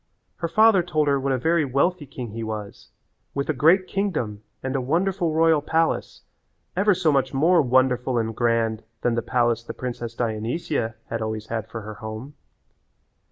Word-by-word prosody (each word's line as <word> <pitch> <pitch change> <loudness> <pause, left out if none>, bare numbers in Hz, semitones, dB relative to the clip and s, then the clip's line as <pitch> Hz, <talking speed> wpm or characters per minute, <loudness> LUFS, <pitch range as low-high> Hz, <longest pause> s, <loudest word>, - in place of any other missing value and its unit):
Her 170 - -2
father 215 +2 +5
told 155 -4 0
her 140 -1 +3
what 135 0 -1
a 130 - +2
very 165 +5 +2
wealthy 145 +4 0
king 120 -4 -7
he 115 +1 -5
was 110 -2 -6 0.5
with 140 +1 -2
a - - +3
great 165 +8 +4
kingdom 165 - -2 0.2
and 130 +1 -2
a 135 - +1
wonderful 175 +5 0
royal 160 -2 +4
palace 160 +2 0 0.5
ever 200 +1 +3
so 170 -4 +2
much 135 -2 +1
more 165 +5 +5
wonderful 125 -1 +2
and 115 -1 -1
grand 115 -2 +1 0.2
than 120 - +1
the 115 - 0
palace 120 -1 +1
the - - -7
princess 120 -2 -5
Dionysia 115 +1 -2
had 115 0 -3
always 110 0 -3
had 110 -1 -3
for 115 - -6
her 110 +1 -7
home. 110 +6 -7
130 Hz, 175 wpm, -24 LUFS, 115-165 Hz, 0.5 s, father